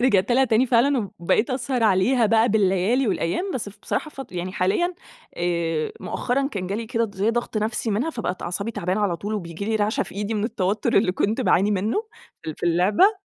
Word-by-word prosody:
رجعت 240 -2 +3
لها 265 +2 +5
تاني 240 +1 +3
فعلًا، 240 -3 +2
وبقيت 175 +8 +1
اسهر 255 -1 -1
عليها 220 +4 +3
بقى 225 +2 +4
بالليالي 205 +4 +2
والأيام 185 - -1
بس 225 -5 -3
ف 205 - -15
بصراحة 310 - -2
فت 270 -7 -9
يعني 180 +1 -4
حاليًا 210 - +1 0.4
آآ 170 -3 -1
مؤخرًا 275 +3 -1
كان 195 -9 -4
جالي 210 +5 -3
كده 230 0 0
د 205 -2 -8
زي 200 +4 +1
ضغط 240 -1 -2
نفسي 215 +1 -1
منها 230 +11 0
فبقت 190 - -4
أعصابي 200 +5 -3
تعبانة 185 -1 -2
على 195 -5 +1
طول، 205 +5 -4
وبييجي 170 -2 -5
لي 220 +1 0
رعشة 210 +1 +1
في - - -10
إيدي 205 +2 -2
من 210 0 -1
التوتر 205 -2 -1
اللي 195 -2 +3
كنت 215 +6 0
باعاني 205 -4 +3
منُّه 210 - 0 0.4
في 160 - -4
ال - - -7
في - - -3
اللعبة 205 - +3
210 Hz, 205 wpm, -23 LUFS, 185-240 Hz, 0.4 s, لها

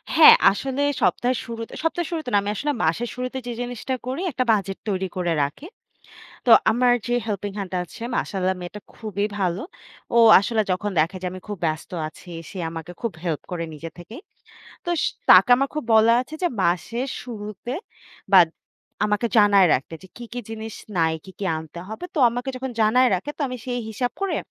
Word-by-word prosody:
হ্যাঁ 320 -1 +10 0.2
আসলে 265 +7 -3 0.2
সপ্তাহের 250 +1 +2
শুরুতে 230 -1 -7
সপ্তাহের 330 +1 -1
শুরুতে 315 -6 -3
না - - +6
আমি 200 - -3
আসলে 295 +8 -1
মাসের 195 +10 0
শুরুতে 255 +1 -4
যে - - -2
জিনিসটা 245 +1 -4
করি 265 +6 -3
একটা 255 -1 0
বাজেট 195 -3 0
তৈরি 190 -1 -1
করে 175 -2 0
রাখি। 145 - -5 0.8
তো - - +4 0.2
আমার 245 +2 +3
যে 240 - 0
হেল্পিং 205 -2 -3
হ্যান্ড 195 -2 -5
আছে 180 +5 -11
মাশাল্লাহ 190 -1 -1
মেয়েটা 180 +4 -7
খুবই 205 -2 -2
ভালো। 185 +1 0 0.5
ও - - +7 0.2
আসলে 220 +2 0
যখন 205 +3 -2
দেখে 165 +5 0
যে - - -2
আমি 185 - -8
খুব 205 - -4
ব্যস্ত 155 0 -3 0.2
আছি 175 +3 -13 0.2
সে 195 - -8
আমাকে 165 +1 -7
খুব 230 -3 -2
হেল্প 165 -4 -2
করে 175 -2 -3
নিজে 165 +2 -7
থেকেই। 215 - -10 0.6
তো 345 - -2 0.4
তাকে 190 +5 +8
আমার 275 +2 0
খুব 305 - -3
বলা 220 +1 +6
আছে 280 +5 -11
যে 355 - +3
মাসের 230 +9 0
শুরুতে 215 0 -7 0.6
বা 195 - +9 0.7
আমাকে 210 +2 +1
জানায় 200 -2 +6
রাখতে 135 +5 -3
যে 190 - -13
কি, 240 - -8
কি 245 - -3
জিনিস 220 0 -6 0.2
নাই, 160 -1 +2
কি, 190 - -11
কি 205 - -4
আনতে 160 +2 -9
হবে। 220 +10 -7
তো - - -2
আমাকে 245 +3 -4
যখন 260 +1 -4
জানায় 250 +4 +5
রাখে 185 +11 -3
তো - - -17
আমি 250 - -5
সেই 245 -1 -2
হিসাব 245 +3 -2
করে 395 -1 0
215 Hz, 190 wpm, -23 LUFS, 185-245 Hz, 0.8 s, হ্যাঁ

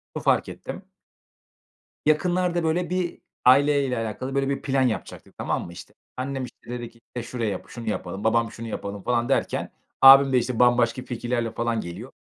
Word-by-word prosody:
Şunu - - -4
fark - - +2
ettim - - -8 1.2
yakınlarda, 175 +2 +2
böyle, 175 +3 0
bir 180 -2 -2 0.3
aileyle 140 -1 +4
alakalı, 120 +4 -4
böyle, 135 0 +1
bir 140 - -2
plan 135 0 +1
yapacaktık, 120 -5 -3
tamam - - -2
mı? 85 - -10
İşte, 95 +4 -12 0.2
annem, 135 0 -3
işte, 120 - -12
dedi 120 -1 -5
ki, 115 - -24 0.2
"Şurayı, 115 -6 -3
şunu 115 -2 -7
yapalım." 100 -1 -4
Babam, 115 0 +2
"Şunu 115 0 -7
yapalım." 100 -2 -5
falan 120 0 0
derken 135 - 0 0.3
abim 135 0 +9
de, 125 - +5
işte, 120 -1 -2
bambaşka 120 0 +3
fikirlerle 120 -1 -2
falan 115 -1 -1
geliyor. 90 +9 -8
125 Hz, 165 wpm, -25 LUFS, 115-135 Hz, 1.2 s, abim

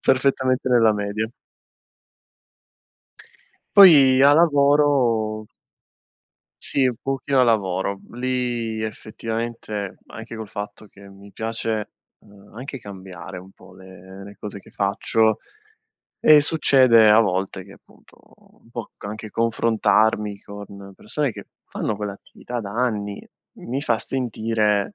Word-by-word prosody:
Perfettamente 130 -1 +1
nella 115 -3 +4
media. 105 +1 -3 2.5
Poi 140 -10 +8
a 140 +1 +7
lavoro 140 -8 +2 1.2
Sì, 135 - +1
un 125 - -2
pochino 135 0 0
a - - +6
lavoro. 100 -4 0
Lì 120 -3 -2
effettivamente 110 -1 -5
anche 115 +1 -9
col 110 -1 -7
fatto 105 +1 -8
che 100 0 -16
mi 100 +1 -15
piace, 110 -1 -3 0.3
ehm, 100 0 -19
anche 135 +3 -7
cambiare 95 -6 -10
un 95 +1 -12
po' - - -18
le 95 +1 -13
le 100 +1 -12
cose 100 -1 -7
che - - -18
faccio, 110 +2 +1 0.8
e 155 -1 +7
succede 130 -7 +5
a 105 +1 +7
volte 95 -3 -2
che - - -15
appunto - - -23 0.5
un 115 - -23
po' 120 -2 -7
c - - -16
anche 110 +1 -7
confrontarmi 110 -2 +1
con 100 -1 -11
persone 140 +4 -2
che - - -10 0.2
fanno 105 - -4
quell'attività 105 +4 -7
da 100 -3 -7
anni 105 -4 -2 0.3
mi 130 +4 -4
fa 115 -5 +1
sentire, 110 - -1
110 Hz, 120 wpm, -22 LUFS, 100-125 Hz, 2.5 s, Poi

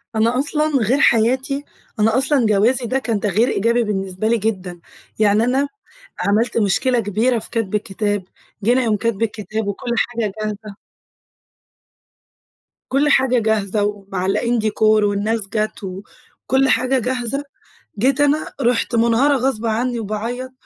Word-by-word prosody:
أنا 230 +3 +2
أصلًا 300 +2 0
غير 250 +5 +1
حياتي، 260 +5 +2 0.4
أنا 220 +3 +3
أصلًا 270 -1 +2
جوازي 225 +5 +2
ده 260 +3 0
كان 230 -5 -2
تغيير 210 +4 +1
إيجابي 235 +1 +1
بالنسبة 195 0 -2
لي 235 +1 +2
جدًا. 190 -5 -3 0.4
يعني 215 +1 +3
أنا 265 +4 +1 0.5
عملت 210 +7 +1
مشكلة 235 +4 +2
كبيرة 225 +4 +1
في - - -8
كتب 225 -4 -2
الكتاب، 205 0 -2 0.4
جينا 245 +4 +3
يوم 215 -2 +1
كتب 230 -1 -2
الكتاب 215 -1 -3
وكُلّ 200 +4 -4
حاجة 230 -4 -1
جاهزة 210 -1 -5 2.1
كُلّ 280 +3 +2
حاجة 260 -3 +3
جاهزة 215 -2 0
ومعلّقين 205 +3 -1
decor 215 0 -3
والناس 215 0 +2
جت 215 0 -3
و 190 0 -6 0.4
وكُلّ 265 0 +2
حاجة 255 +3 +2
جاهزة. 250 +3 -2 0.6
جيت 270 +4 +2
أنا 290 +2 +1
رُحت 240 0 +1
منهارة 235 +5 +3
غصب 245 -3 -1
عني 235 +2 -1
وباعيط 230 +5 -4
225 Hz, 135 wpm, -19 LUFS, 210-250 Hz, 2.1 s, أنا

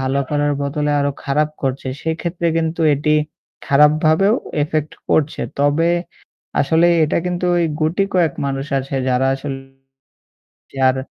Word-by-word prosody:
ভালো 135 +1 0
করার 145 0 +1
বদলে 150 +1 -1
আরো 140 0 +1
খারাপ 150 +2 +1
করছে। 135 0 -2
সেক্ষেত্রে 170 +1 -2
কিন্তু 165 +1 -1
এটি 150 +2 0 0.5
খারাপভাবেও 155 +8 +4 0.3
ইফেক্ট 155 0 -2 0.2
করছে। 155 0 +1 0.2
তবে 145 +4 +2 0.7
আসলে 160 +4 +3 0.2
এটা 150 - -1
কিন্তু 180 0 -2
ঐ - - +2 0.2
গুটি 165 +6 +1
কয়েক 170 -5 +3
মানুষ 135 +1 -3
আছে 135 +1 -5
যারা 130 +1 +2
আসলে 135 0 -5 1.3
আর 130 - +1
150 Hz, 130 wpm, -19 LUFS, 140-160 Hz, 1.3 s, খারাপভাবেও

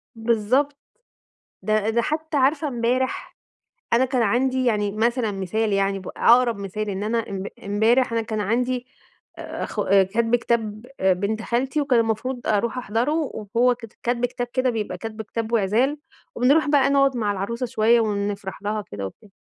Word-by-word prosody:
بالضبط. 235 +5 +1 0.9
ده 215 0 +1
ده 235 +1 +2
حتّى 310 +3 -2
عارفة 285 +3 +2
امبارح 250 0 -1 0.6
أنا 245 +3 +4
كان 255 -2 0
عَندي 255 +4 +1
يعني 210 -4 +1
مثلًا 230 +1 +1
مثال 200 +3 -1
يعني 195 0 +1
ب 185 - -8
ع - - +6
أقرب 245 -3 +1
مثال 200 +2 -4
إن 195 +1 -3
أنا 230 +1 -1
امب 195 0 -4 0.2
امبارح 220 +5 +2
أنا 230 - +1
كان 215 -1 -3
عَندي 245 +4 -1 0.5
آآ - - -5
أخو - - -3
كَتب 200 +5 +3
كتاب 225 -2 -1
آآ 190 0 +4
بنت 205 +4 -2
خالتي 260 +6 0
وكان 270 -4 +3
المفروض 230 +3 -2
أروح 220 +3 0
أحضرُه، 240 +4 0 0.4
وهو 245 +1 +4
كت 230 -2 -12
كَتب 245 0 +1
كتاب 245 0 -4
كده 255 0 +2
بيبقى 215 -6 -3
كَتب 220 +3 -6
كتاب 225 +1 -4
وعِزال، 230 +7 +2 0.4
وبنروح 280 +6 +3
بقى 285 -2 +4
نقعد 275 -2 +3
مع 210 -3 0
العروسة 220 +6 -3
شوية 230 0 +3
ونفرح 200 -2 -3
لها 215 +1 -1
وكده 105 - -6
وبتاع، 200 - -11
230 Hz, 165 wpm, -23 LUFS, 210-250 Hz, 0.9 s, ع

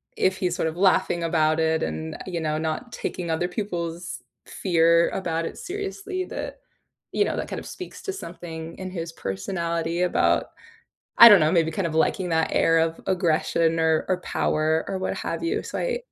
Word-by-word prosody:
if 190 0 +1
he's 180 -2 -1
sort 160 - 0
of 160 - -4
laughing 180 -2 +3
about 160 -1 +2
it 160 0 +2
and, 80 0 -4
you 175 -2 -3
know, 155 -1 -1
not 160 +10 -3
taking 170 -3 -4
other 170 +2 0
people's 175 -3 -4 0.2
fear 170 -2 +3
about 165 -3 -2
it - - -6
seriously, 395 0 -4
that, - - -6 0.5
you - - +3
know, - - -2
that - - -3
kind - - -4
of - - -11
speaks - - -9
to 390 - -3
something 165 - -8
in 185 -1 -6
his 165 -2 -5
personality 170 - -2
about 180 - +2 0.7
I 235 - +14
don't 205 -4 +8
know, 155 0 +3
maybe 165 -2 +3
kind 185 +2 -1
of 155 - -6
liking 180 +3 +1
that 160 -1 +1
air 165 0 +4
of 165 0 0
aggression 165 -2 +1
or 160 -1 +2
or 185 -1 0
power 155 -1 0
or 190 - -2
what 190 - -2
have - - -4
you, 335 - -1
so - - -5
I - - -1
170 Hz, 190 wpm, -25 LUFS, 160-185 Hz, 0.7 s, I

